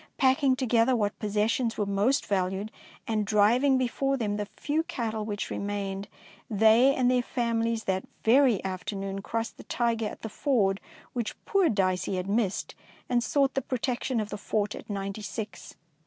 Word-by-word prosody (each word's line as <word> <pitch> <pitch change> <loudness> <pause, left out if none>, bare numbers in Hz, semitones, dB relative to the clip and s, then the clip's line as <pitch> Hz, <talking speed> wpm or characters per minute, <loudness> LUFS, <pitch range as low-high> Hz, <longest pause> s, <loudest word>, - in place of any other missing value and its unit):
Packing 265 0 +4
together 250 -1 +3
what 205 -3 -1
possessions 220 +3 0
were 210 - +1
most 200 +8 +1
valued, 195 +2 -1 0.4
and 215 -2 +1
driv 210 +5 +3
ing 275 -2 +4
before 270 +2 0
them 210 -4 -1
the 210 -1 -3
few 300 +2 0
cattle 225 -8 -3
which 205 -1 -4
remained, 200 -1 -3 0.4
they 225 +5 +5
and 250 -1 +3
their 250 -1 +3
families 230 -2 -1
that 190 0 -1 0.2
very 240 -3 +4
afternoon 195 +1 -4
crossed 225 +3 -3
the - - -11
Tyger 230 -2 0
at - - -11
the - - -2
ford 210 -5 +1 0.3
which 235 -4 -3
poor 390 -5 +3
Dicey 185 -3 0
had 185 0 -3
missed, 205 -1 0 0.4
and 240 -1 +2
sought 275 +4 +2
the 270 - 0
protection 250 0 -1
of 210 -1 -3
the 205 - -5
fort 210 0 -1
at - - -10
Ninety 200 +1 -4
six. 205 +1 -6
220 Hz, 170 wpm, -28 LUFS, 205-250 Hz, 0.4 s, they